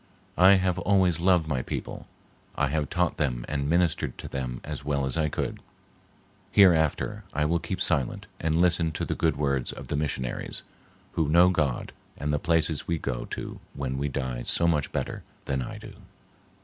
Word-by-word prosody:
I 95 +2 +8
have 95 -2 +2
always 90 -3 +3
loved 90 -2 +3
my 65 -5 0
people. - - -5 0.5
I 70 -1 +1
have 75 -1 -1
taught 90 0 0
them 60 -7 -1
and 70 -1 -1
ministered 85 -5 +1
to - - -7
them 65 -2 -4
as 75 -2 -6
well 70 -1 0
as 65 - -2
I 80 -2 +1
could. - - -3 0.9
Hereafter, 85 -6 +4
I 75 +1 +1
will 85 +2 +2
keep 95 - -4
silent 70 -7 0
and 80 0 +1
listen 85 -2 +3
to - - -2
the - - -1
good 80 -1 +1
words 70 -3 0
of - - -9
the - - -1
missionaries, 65 -4 -3 0.5
who 80 -3 0
know 85 +3 +6
God 75 -8 -1 0.2
and 75 +1 -1
the 75 - +1
places 80 -2 +1
we 85 - 0
go - - -3
to - - -6 0.2
when 65 -1 -3
we 70 +1 -1
die 65 -2 -3
so 85 +7 +1
much 75 -4 +1
better - - -3 0.2
than 65 -2 -1
I - - -5
do." - - -10
75 Hz, 185 wpm, -27 LUFS, 70-85 Hz, 0.9 s, I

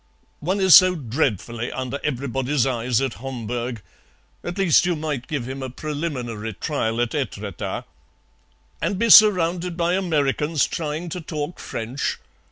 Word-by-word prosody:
"One 185 +6 -1
is 190 -3 +6
so 185 0 +8
dreadfully 120 - -2
under 130 +2 -4
everybody's 135 -1 -1
eyes 125 -2 0
at 135 -4 -3
Homburg. 120 -3 -4 0.6
At 175 +2 -5
least 185 -7 +4
you 175 - +1
might 150 -5 -4
give 140 -6 -3
him 135 +1 -6
a 130 - -4
preliminary 125 -7 -4
trial 115 -2 -2
at 120 - -1
Etretat." 105 - -4 1.0
"And 195 - -1
be 230 +2 +2
surrounded 180 -4 +6
by 170 0 +1
Americans 155 -4 +1
trying 160 +2 -4
to 180 +2 -5
talk 155 0 -5
French? 120 +5 -3
145 Hz, 140 wpm, -23 LUFS, 120-170 Hz, 1.0 s, so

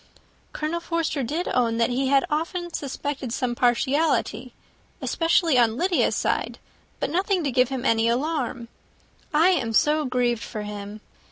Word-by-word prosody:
"Colonel 310 +3 -2
Forster 335 -4 -2
did 310 +9 -2
own 230 -2 +1
that 230 +2 +2
he 265 +2 0
had 275 0 +3
often 340 +3 -2
suspected 280 -2 -4
some 245 0 -1
partiality, 260 +6 +1 0.4
especially 330 -4 +2
on 230 -1 +3
Lydia's 360 +3 +1
side, - - -1 0.4
but - - -2
nothing 370 +1 +1
to 280 - 0
give 250 0 +3
him 265 -2 -4
any 225 -1 +3
alarm. 255 -2 -2 0.6
I 320 +4 +4
am 250 -12 0
so 300 +6 +3
grieved 245 -2 0
for 215 -3 -6
him. 205 0 -7
270 Hz, 150 wpm, -24 LUFS, 240-325 Hz, 0.6 s, I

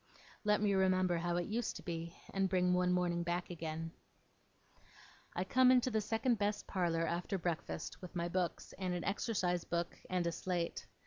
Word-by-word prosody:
Let 210 -1 +3
me 205 -1 +3
remember 185 -2 +3
how 175 +1 0
it 175 - 0
used 225 +2 -1
to - - -8
be, 165 -1 -4 0.2
and 195 -1 +2
bring 180 -1 +3
one 180 0 +3
morning 175 -1 +1
back 175 +1 -2
again. 165 -1 -4 1.4
I 180 - +1
come 255 +6 +5
into 255 0 +5
the 220 -1 +2
second 225 +2 +1
best 205 0 0
parlour 170 -3 +1
after 175 +4 -1
breakfast, 170 -2 -3
with 180 0 -9
my 170 0 0
books, 175 0 -2
and 185 -2 -1
an 175 - -3
exercise 185 -4 0
book, 170 0 -2
and 180 -1 +1
a 170 - +1
slate. 170 0 -2
180 Hz, 180 wpm, -36 LUFS, 170-195 Hz, 1.4 s, come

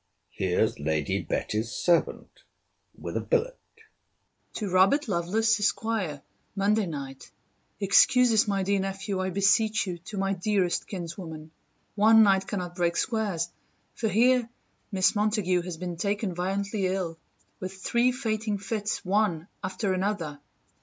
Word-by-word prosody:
here's 90 -5 0
Lady 75 0 -1
Betty's 110 +2 -2
servant, 175 +7 0 0.6
with - - -6
a - - 0
billet. - - 0 0.9
TO 210 - -4
ROBERT 190 +11 +3
LOVELACE, 215 +4 +1
ESQ. 205 -7 -1 0.3
MONDAY 205 +1 +2
NIGHT. 135 -4 -7 0.5
Excuse 240 +5 +5
us, 220 0 +4
my 195 -1 0
dear 200 +1 +1
Nephew, 195 0 -3
I 185 - -1
beseech 210 +4 +2
you, 180 -3 -5
to 205 - -7
my 195 0 0
dearest 190 -1 0
kinswoman. 165 -4 -7 0.4
One 220 +2 +6
night 195 -2 +3
cannot 180 -4 -4
break 170 -1 0
squares: 205 -8 -1 0.4
for 225 - -2
here 240 +2 +3 0.4
Miss 190 0 +2
Montague 205 -4 +1
has 175 -1 -6
been 175 0 -5
taken 200 +1 -1
violently 195 +3 -1
ill 180 -3 -3 0.4
with 185 0 -5
three 235 +6 +1
fainting 220 -4 -2
fits, 205 +1 -3
one 190 -4 +1 0.2
after 190 +1 -1
another. 185 -6 -2
195 Hz, 135 wpm, -27 LUFS, 175-215 Hz, 0.9 s, One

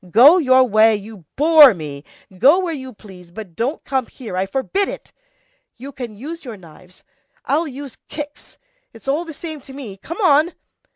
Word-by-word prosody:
Go 275 - +7
your 260 -4 +5
way, 220 -2 +4
you 205 -3 -10
bore 300 -5 +7
me! 145 -4 -8 0.3
Go 270 - +5
where 365 -3 -2
you 260 -3 -7
please, 190 -5 -15
but 185 -2 -10
don't 255 - -3
come 265 -3 -2
here, 230 -8 -9
I 190 +1 -1
forbid 275 - -1
it! - - -9 0.6
You 270 +4 -9
can 245 -5 -8
use 320 +8 -8
your 235 -6 -8
knives. 180 +1 -18 0.4
I'll 310 +5 0
use 275 -2 -9
kicks; 295 -1 -9 0.4
it's 225 +3 -16
all 300 +6 0
the 330 - -8
same 315 0 -8
to 270 - -13
me, 240 -8 -9
come 335 - -8
on!" 315 -1 +3
260 Hz, 180 wpm, -19 LUFS, 210-295 Hz, 0.6 s, Go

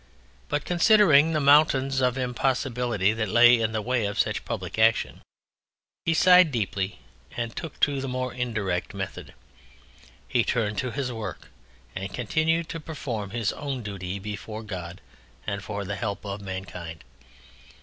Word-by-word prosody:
But 145 0 -1
considering 170 -4 +5
the 155 - +2
mountains 140 -2 +4
of 125 0 +1
impossibility 125 -4 0
that 110 -2 -2
lay 120 +2 +6
in 110 -1 0
the 110 -1 -2
way 120 -3 0
of 100 - -5
such - - 0
public - - -4
action, 110 +1 +2 0.8
he 165 - +2
sighed 180 -1 +6
deeply 100 -4 -2 0.4
and 115 -1 -3
took 165 -3 -7
to 140 -2 +2
the 135 - -4
more 130 0 -3
indirect 105 -7 -2
method. 100 -1 -6 0.9
He 120 - +2
turned 105 -4 -1
to 130 - -1
his 130 +1 -3
work 110 -6 -7 0.5
and 95 +1 -4
continued 160 +7 0
to 165 - -5
perform 130 -10 -5
his 115 -1 -1
own 140 -4 -4
duty 95 -2 -5
before 105 +2 -6
God 90 -4 -7 0.4
and 100 -1 -3
for 100 0 -4
the 100 +1 -4
help 100 -3 -4
of 100 0 -5
mankind. 90 -5 -7
115 Hz, 150 wpm, -26 LUFS, 100-135 Hz, 0.9 s, lay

